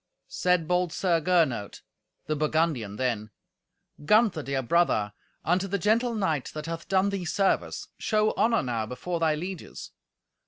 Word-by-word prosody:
Said 180 Hz, -3 st, +1 dB
bold 180 Hz, 0 st, +1 dB
Sir 170 Hz, -2 st, +1 dB
Gernot, 155 Hz, -, +1 dB, 0.4 s
the 155 Hz, -, -1 dB
Burgundian, 150 Hz, -8 st, 0 dB
then, 115 Hz, -3 st, -2 dB, 0.7 s
"Gunther, 210 Hz, -1 st, +3 dB
dear 135 Hz, -2 st, -2 dB
brother, 120 Hz, -9 st, +2 dB, 0.3 s
unto 180 Hz, +3 st, +1 dB
the 200 Hz, +1 st, -1 dB
gentle 230 Hz, +5 st, +1 dB
knight, 160 Hz, -, -1 dB
that 155 Hz, 0 st, -5 dB
hath 165 Hz, 0 st, -5 dB
done 190 Hz, +1 st, +3 dB
thee 195 Hz, -2 st, -3 dB
service, 190 Hz, +3 st, 0 dB
show 215 Hz, -1 st, +1 dB
honour 230 Hz, 0 st, +2 dB
now 115 Hz, -4 st, -2 dB
before 170 Hz, +9 st, -4 dB
thy 160 Hz, -2 st, +2 dB
lieges. 180 Hz, +3 st, -7 dB
165 Hz, 145 wpm, -27 LUFS, 140-190 Hz, 0.7 s, Gunther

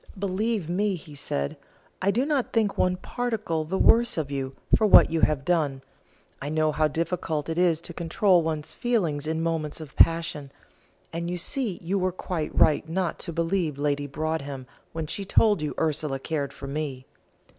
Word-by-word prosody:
"Believe 200 Hz, 0 st, -1 dB
me," 195 Hz, +3 st, 0 dB
he 155 Hz, -3 st, -11 dB
said, 70 Hz, -, -3 dB, 0.4 s
"I 190 Hz, -, +2 dB
do 235 Hz, +7 st, +2 dB
not 285 Hz, -4 st, 0 dB
think 220 Hz, -3 st, +2 dB
one 180 Hz, 0 st, +2 dB
particle 215 Hz, -7 st, -2 dB
the 185 Hz, +5 st, -2 dB
worse 235 Hz, 0 st, +4 dB
of 145 Hz, -3 st, -2 dB
you 135 Hz, -1 st, -3 dB, 0.2 s
for 215 Hz, -, +3 dB
what 200 Hz, -, +8 dB
you 165 Hz, -1 st, 0 dB
have 140 Hz, -3 st, +2 dB
done; 145 Hz, -6 st, 0 dB, 0.6 s
I 140 Hz, -, -3 dB
know 155 Hz, 0 st, +2 dB
how 155 Hz, +1 st, +2 dB
difficult 160 Hz, -1 st, -2 dB
it 165 Hz, +1 st, -1 dB
is 170 Hz, -3 st, +3 dB
to 170 Hz, -, -8 dB
control 175 Hz, +2 st, +3 dB
one's 160 Hz, -2 st, -3 dB
feelings 170 Hz, -12 st, -1 dB
in 160 Hz, +1 st, -1 dB
moments 160 Hz, -2 st, -2 dB
of 155 Hz, -4 st, -10 dB
passion; 165 Hz, -4 st, +3 dB, 0.6 s
and 170 Hz, +1 st, -3 dB
you 180 Hz, -, -2 dB
see 220 Hz, -, -2 dB
you 190 Hz, +4 st, 0 dB
were 185 Hz, 0 st, +1 dB
quite 175 Hz, -3 st, -3 dB
right 155 Hz, +1 st, +4 dB
not 180 Hz, +1 st, -1 dB
to 170 Hz, -, -4 dB
believe 165 Hz, -2 st, -1 dB
Lady 145 Hz, 0 st, 0 dB
Broadhem 145 Hz, -2 st, -3 dB, 0.3 s
when 160 Hz, -1 st, -4 dB
she 195 Hz, +6 st, -4 dB
told 205 Hz, -1 st, +3 dB
you 150 Hz, -, -3 dB
Ursula 150 Hz, -3 st, 0 dB
cared 140 Hz, 0 st, -3 dB
for 135 Hz, -, -9 dB
me." 135 Hz, -2 st, -4 dB
165 Hz, 180 wpm, -26 LUFS, 150-185 Hz, 0.6 s, what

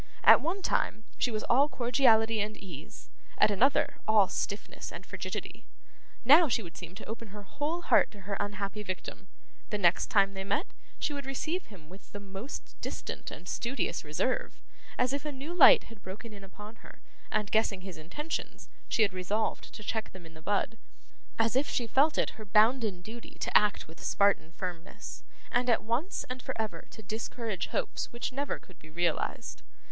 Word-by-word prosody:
At -, -, +9 dB
one 365 Hz, +5 st, -2 dB
time, 220 Hz, -, 0 dB, 0.2 s
she -, -, +2 dB
was 215 Hz, -2 st, -2 dB
all 275 Hz, +5 st, +4 dB
cordiality 230 Hz, -4 st, +4 dB
and 215 Hz, +1 st, -3 dB
ease; 165 Hz, -7 st, -10 dB, 0.3 s
at -, -, +5 dB
another, 260 Hz, +8 st, +3 dB
all 215 Hz, -3 st, +6 dB
stiffness 200 Hz, +2 st, -4 dB
and -, -, -8 dB
frigidity. -, -, -6 dB, 0.6 s
Now, 310 Hz, +6 st, +8 dB
she 230 Hz, -3 st, +1 dB
would 170 Hz, -2 st, -10 dB
seem 175 Hz, 0 st, -9 dB
to 205 Hz, -, -9 dB
open 230 Hz, +1 st, -6 dB
her 205 Hz, +1 st, -9 dB
whole 310 Hz, -, -3 dB
heart -, -, +5 dB
to 205 Hz, -, -13 dB
her 200 Hz, +1 st, -3 dB
unhappy 205 Hz, 0 st, -3 dB
victim; 190 Hz, 0 st, -6 dB, 0.4 s
the 210 Hz, -, -1 dB
next 180 Hz, -3 st, +3 dB
time 195 Hz, -1 st, +4 dB
they 190 Hz, 0 st, -4 dB
met, 205 Hz, -, 0 dB, 0.3 s
she 300 Hz, -, -1 dB
would 280 Hz, -2 st, -5 dB
receive 315 Hz, +7 st, -2 dB
him 180 Hz, -8 st, -14 dB
with 190 Hz, +4 st, -14 dB
the 205 Hz, -, -5 dB
most 200 Hz, +6 st, -8 dB
distant -, -, -5 dB
and 180 Hz, -, -10 dB
studious 240 Hz, +5 st, -2 dB
reserve, 155 Hz, +12 st, -1 dB, 0.4 s
as 250 Hz, +1 st, +2 dB
if 280 Hz, -, -2 dB
a 300 Hz, -, -3 dB
new 285 Hz, +5 st, -6 dB
light 350 Hz, -5 st, +8 dB
had 225 Hz, -3 st, -14 dB
broken 210 Hz, +4 st, -8 dB
in 200 Hz, -1 st, -11 dB
upon 210 Hz, +3 st, -11 dB
her, -, -, -15 dB, 0.3 s
and, 210 Hz, -1 st, 0 dB
guessing 215 Hz, -3 st, +2 dB
his 185 Hz, -3 st, -8 dB
intentions, 295 Hz, -, -5 dB, 0.2 s
she 225 Hz, -, +4 dB
had 200 Hz, -3 st, +1 dB
resolved 195 Hz, +4 st, -1 dB
to 215 Hz, -, -9 dB
check 220 Hz, +1 st, -3 dB
them 185 Hz, -3 st, -11 dB
in 165 Hz, -, -13 dB
the 160 Hz, -, -13 dB
bud; 205 Hz, +5 st, 0 dB, 0.6 s
as 225 Hz, +1 st, +2 dB
if 275 Hz, +3 st, +2 dB
she 240 Hz, -, 0 dB
felt 280 Hz, +7 st, +3 dB
it -, -, +2 dB
her -, -, -5 dB
bounden 215 Hz, -1 st, +3 dB
duty 230 Hz, +4 st, -9 dB
to -, -, -3 dB
act 210 Hz, -1 st, +4 dB
with 160 Hz, -, -13 dB
Spartan 200 Hz, -5 st, +3 dB
firmness, 175 Hz, -1 st, -6 dB, 0.3 s
and 245 Hz, +1 st, +2 dB
at 225 Hz, -3 st, +3 dB
once 245 Hz, -, -1 dB
and 255 Hz, 0 st, -5 dB
for 260 Hz, -2 st, -5 dB
ever 220 Hz, -1 st, -3 dB
to 220 Hz, -, -11 dB
discourage 220 Hz, -1 st, -3 dB
hopes -, -, -2 dB
which 240 Hz, +2 st, -3 dB
never 280 Hz, +2 st, -2 dB
could 185 Hz, -, -19 dB
be 155 Hz, -, -14 dB
realised. 170 Hz, 0 st, -1 dB
215 Hz, 190 wpm, -30 LUFS, 195-250 Hz, 0.6 s, At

